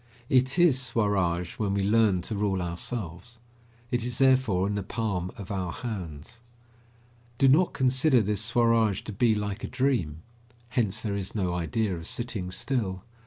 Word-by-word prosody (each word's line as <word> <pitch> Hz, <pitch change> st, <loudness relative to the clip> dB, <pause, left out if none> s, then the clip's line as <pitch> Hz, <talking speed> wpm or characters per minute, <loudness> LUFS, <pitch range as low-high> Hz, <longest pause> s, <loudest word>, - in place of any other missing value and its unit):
It 130 Hz, +3 st, +3 dB
is 165 Hz, -7 st, +4 dB
Swaraj 100 Hz, -8 st, 0 dB
when 100 Hz, -2 st, 0 dB
we 100 Hz, -, 0 dB
learn 105 Hz, -3 st, +3 dB
to 110 Hz, -, -4 dB
rule 100 Hz, -2 st, 0 dB
ourselves. 90 Hz, +4 st, -5 dB, 0.5 s
It 120 Hz, -1 st, 0 dB
is 120 Hz, -1 st, -2 dB
therefore 130 Hz, -8 st, +3 dB
in 100 Hz, -, -1 dB
the 100 Hz, -, -1 dB
palm 100 Hz, -4 st, -3 dB
of 100 Hz, -1 st, -8 dB
our 95 Hz, -3 st, -2 dB
hands. 95 Hz, -1 st, -7 dB, 1.0 s
Do 135 Hz, -, +4 dB
not 160 Hz, +7 st, +4 dB
consider 130 Hz, 0 st, +3 dB
this 105 Hz, -1 st, -1 dB
Swaraj 115 Hz, -3 st, +2 dB
to 110 Hz, -, -7 dB
be 110 Hz, +2 st, +3 dB
like 105 Hz, +2 st, -4 dB
a -, -, -2 dB
dream. 90 Hz, -, -1 dB, 0.5 s
Hence 110 Hz, -5 st, -1 dB
there 105 Hz, -3 st, -2 dB
is 100 Hz, 0 st, -4 dB
no 90 Hz, -4 st, 0 dB
idea 95 Hz, +4 st, -1 dB
of 80 Hz, -1 st, -4 dB
sitting 115 Hz, -7 st, -3 dB
still. 95 Hz, -3 st, -2 dB
105 Hz, 165 wpm, -27 LUFS, 95-120 Hz, 1.0 s, is